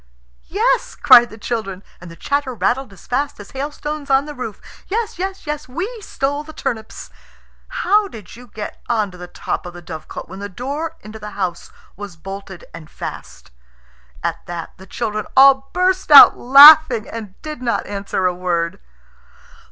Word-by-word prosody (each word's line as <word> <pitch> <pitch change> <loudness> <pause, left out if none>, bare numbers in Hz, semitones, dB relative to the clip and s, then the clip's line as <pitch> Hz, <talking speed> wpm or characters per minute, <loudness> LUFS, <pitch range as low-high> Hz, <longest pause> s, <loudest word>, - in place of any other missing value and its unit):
"Yes," - - 0
cried 240 0 +7
the 220 - -12
children, 205 -4 -4 0.2
and 180 - -10
the 165 - -12
chatter 280 +4 -2
rattled 240 +5 -1
as 195 - -17
fast 280 +2 -2
as 205 - -12
hailstones 290 +1 -5
on 270 +1 +3
the 300 - -7
roof. 250 -6 -7 0.3
"Yes! 430 -2 -3
yes! 385 +1 -4
yes! 300 -1 -5
We 345 +10 -3
stole 285 -5 -3
the 315 +1 -12
turnips." 220 -6 -6 0.6
"How 420 -4 +1
did 215 - -12
you 245 +1 -14
get 215 -1 -8
on 215 -4 0
to 180 - -13
the 180 - -8
top 175 - -5
of 175 - -10
the 175 - -10
dovecot 160 -2 -8
when 190 +3 -10
the 205 0 -6
door 280 - -5
into 215 +1 -11
the 210 0 -9
house 180 -3 -4 0.2
was 200 -2 -9
bolted 195 +1 -9
and 160 -2 -11
fast?" 65 0 -9 0.7
At - - -3
that 170 -1 -7
the 190 0 -14
children 215 0 -4
all 270 0 +6
burst 370 0 0
out 290 -2 +10
laughing, 275 -2 +8
and 215 -4 -9
did 305 -5 -7
not 240 -2 -1
answer 200 -2 -3
a 180 - +2
word. 175 -2 -2
235 Hz, 175 wpm, -19 LUFS, 195-290 Hz, 0.7 s, out